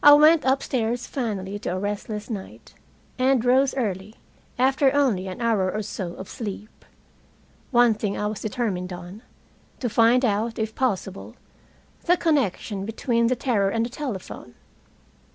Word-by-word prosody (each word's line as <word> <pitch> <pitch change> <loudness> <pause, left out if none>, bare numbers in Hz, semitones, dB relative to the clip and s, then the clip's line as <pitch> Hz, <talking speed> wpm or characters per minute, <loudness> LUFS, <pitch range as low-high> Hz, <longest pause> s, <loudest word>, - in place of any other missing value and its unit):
I 290 - +10
went 305 +1 +6
upstairs 245 -3 0
finally 205 -6 -3
to - - -4
a - - -2
restless 205 +1 -4
night, 200 -4 -8 0.5
and 255 -2 +3
rose 260 +2 +3
early, 210 -4 -3 0.4
after 265 +2 +3
only 230 -10 +2
an 185 - -6
hour 215 -6 +1
or 215 +2 -3
so 185 -4 -5
of 190 - -8
sleep. 210 -1 -7 0.9
One 240 -2 +5
thing 210 -2 -3
I 210 - -2
was 210 -1 -3
determined 200 -5 -2
on 180 +4 -8 0.6
to 245 - -1
find 235 +3 +4
out, 225 +1 0
if 220 0 -2
possible, 195 -7 -2 0.7
the 355 +1 +4
connection 225 - 0
between 230 +2 0
the 255 - +2
terror 215 -7 +1
and 225 +2 0
the 240 - -6
telephone. 205 - -6
225 Hz, 150 wpm, -24 LUFS, 200-255 Hz, 0.9 s, I